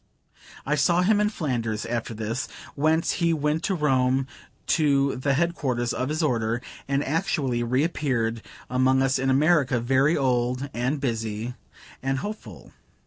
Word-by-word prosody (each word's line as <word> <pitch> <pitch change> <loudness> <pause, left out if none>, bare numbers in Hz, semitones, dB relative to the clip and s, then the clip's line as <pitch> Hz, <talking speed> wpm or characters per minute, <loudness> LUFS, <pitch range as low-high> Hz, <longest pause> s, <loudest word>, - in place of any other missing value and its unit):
I 150 - 0
saw 170 +4 +3
him 210 +2 +3
in 210 - +2
Flanders 120 - -2
after 115 -1 -3
this, 110 +4 -3 0.3
whence 155 +3 +2
he 170 -2 +1
went 150 +1 0
to 195 - 0
Rome 130 -4 +2 0.4
to 140 -3 +2
the 135 +2 0
head 170 +4 +1
quarters 125 -6 -1
of 130 +2 -2
his 155 +2 -1
Order; 115 -4 0 0.3
and 140 +1 +1
actually 140 -6 0
reappeared 125 -3 0 0.3
among 130 +1 +2
us 135 0 +1
in 135 +1 0
America, 140 -2 +3
very 135 +6 +2
old, 125 0 0
and 125 +5 -1
busy, 115 -2 -3 0.5
and 135 0 -1
hopeful. 125 - -7
135 Hz, 145 wpm, -25 LUFS, 120-150 Hz, 0.5 s, saw